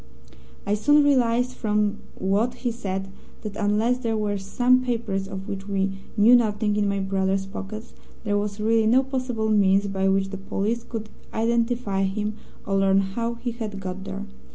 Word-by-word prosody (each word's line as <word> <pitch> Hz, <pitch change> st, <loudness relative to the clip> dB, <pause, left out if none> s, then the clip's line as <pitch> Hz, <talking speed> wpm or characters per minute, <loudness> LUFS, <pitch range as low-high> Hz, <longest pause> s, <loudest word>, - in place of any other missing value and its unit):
"I 200 Hz, -, +1 dB
soon 290 Hz, +8 st, +4 dB
realized 250 Hz, -3 st, +3 dB
from 210 Hz, -1 st, 0 dB, 0.2 s
what 205 Hz, +6 st, 0 dB
he 245 Hz, -1 st, -2 dB
said 195 Hz, -4 st, -4 dB, 0.4 s
that 210 Hz, -2 st, -5 dB
unless 215 Hz, +4 st, +1 dB
there 225 Hz, -3 st, -1 dB
were 205 Hz, -2 st, -1 dB
some 250 Hz, +6 st, +2 dB
papers 220 Hz, -6 st, -2 dB
of 195 Hz, -1 st, -7 dB
which 195 Hz, 0 st, -5 dB
we 195 Hz, -1 st, 0 dB, 0.2 s
knew 225 Hz, +4 st, +7 dB
nothing 210 Hz, -3 st, +2 dB
in 205 Hz, -1 st, +1 dB
my 200 Hz, 0 st, 0 dB
brother's 190 Hz, 0 st, 0 dB
pockets, 210 Hz, +3 st, -7 dB, 0.3 s
there 205 Hz, -2 st, 0 dB
was 205 Hz, 0 st, -4 dB
really 220 Hz, +1 st, +3 dB
no 255 Hz, +4 st, +5 dB
possible 255 Hz, -4 st, -2 dB
means 200 Hz, -1 st, +4 dB
by 195 Hz, -1 st, 0 dB
which 195 Hz, 0 st, +1 dB
the 195 Hz, -, -4 dB
police 210 Hz, +4 st, -2 dB
could 220 Hz, -2 st, -6 dB, 0.3 s
identify 230 Hz, -3 st, +1 dB
him 210 Hz, +2 st, -1 dB, 0.3 s
or 195 Hz, -1 st, 0 dB
learn 195 Hz, 0 st, +4 dB
how 235 Hz, +2 st, -2 dB
he 240 Hz, +1 st, -4 dB
had 220 Hz, -4 st, -5 dB
got 190 Hz, 0 st, -5 dB
there. 195 Hz, +1 st, -5 dB
210 Hz, 175 wpm, -24 LUFS, 195-235 Hz, 0.4 s, knew